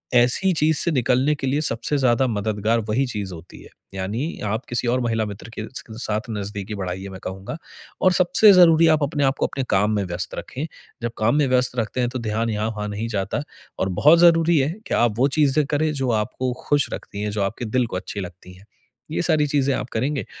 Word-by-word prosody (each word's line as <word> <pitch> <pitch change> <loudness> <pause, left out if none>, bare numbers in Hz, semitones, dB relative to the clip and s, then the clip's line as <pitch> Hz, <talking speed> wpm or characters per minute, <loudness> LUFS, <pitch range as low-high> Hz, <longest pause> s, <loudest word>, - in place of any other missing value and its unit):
ऐसी 125 +11 +4
चीज़ 155 -1 +2
से 170 - +1
निकलने 130 +1 +2
के 135 - -4
लिए 140 +3 +1
सबसे 140 +1 0
ज़्यादा 130 -1 +3
मददगार 110 0 0
वही 130 +6 +1
चीज़ 100 -6 -5
होती 85 +1 -12
है। - - -14 0.2
यानी 105 - -3
आप 110 +4 -2
किसी 120 0 -1
और 125 +2 +2
महिला 115 -2 0
मित्र 105 +2 -8
के 110 -1 -6
स - - -4
के 110 - -10
साथ 110 -2 -1
नज़दीकी 105 -1 -5
बढ़ाइए, 95 0 -5
मैं 95 -1 -9
कहूँगा। 95 +10 -6 0.4
और 185 - +5
सबसे 180 +4 +5
ज़रूरी 165 -3 +6
आप 155 - -2
अपने 145 0 -1
आपको 135 0 +1
अपने 135 - -4
काम 105 +2 +2
में 100 - 0
व्यस्त 85 0 -5
रखें। 140 +4 -5 0.4
जब 120 - -1
काम 110 +5 +2
में 150 -2 +3
व्यस्त 125 -1 +1
रखते 115 +3 -2
हैं, 120 - +1
तो 130 +1 -4
ध्यान 115 0 -1
यहाँ-वहाँ 105 0 -2
नहीं 105 +3 -3
जाता 100 +3 -2 0.4
और 95 - 0
बहुत 160 +3 +7
ज़रूरी 165 -1 +5
है 135 +1 +1 0.2
कि - - -3
आप 120 -2 +3
वो 135 - +5
चीज़ें 145 0 +3
करें 150 +2 0
जो 135 -3 -1
आपको 125 +2 -3 0.2
खुश 145 -1 +2
रखती 100 - -7
हैं, 105 - -1
जो 105 0 -2
आपके 105 +5 -3
दिल 125 +3 +1
को 95 - -6
अच्छी 100 +2 -6
लगती 90 0 -9
हैं। 95 +2 -18 0.5
ये - - -1
सारी 155 -4 +2
चीज़ें 140 -1 +1
आप 125 - -4
करेंगे, 135 +5 -1
120 Hz, 220 wpm, -22 LUFS, 105-145 Hz, 0.5 s, बहुत